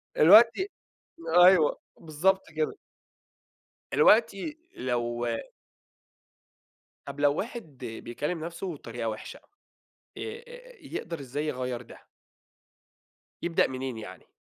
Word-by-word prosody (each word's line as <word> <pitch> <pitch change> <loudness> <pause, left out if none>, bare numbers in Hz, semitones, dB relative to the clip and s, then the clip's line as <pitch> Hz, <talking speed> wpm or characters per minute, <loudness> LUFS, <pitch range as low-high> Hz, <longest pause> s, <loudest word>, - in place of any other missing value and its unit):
دلوقتي 230 - +7 0.7
أيوه، 180 -3 +6 0.2
بالضبط 175 +5 +1
كده. 155 -1 0 1.2
دلوقتي 225 - +3 0.2
لو 120 -1 -2 1.8
طب 140 0 -8
لو 145 0 +3
واحد 210 - -6
بيكلم 125 +8 -4
نفسه 170 +1 -5
بطريقة 115 -4 -5
وحشة، 110 - -7 0.8
آآ 485 +2 -9
يقدر 165 - -6
إزاي 140 +3 -4
يغير 125 -3 -3
ده؟ 115 - -14 1.5
يبدأ 170 -1 +2
منين 130 -2 -5
يعني؟ 95 -4 -10
155 Hz, 85 wpm, -28 LUFS, 125-195 Hz, 1.8 s, دلوقتي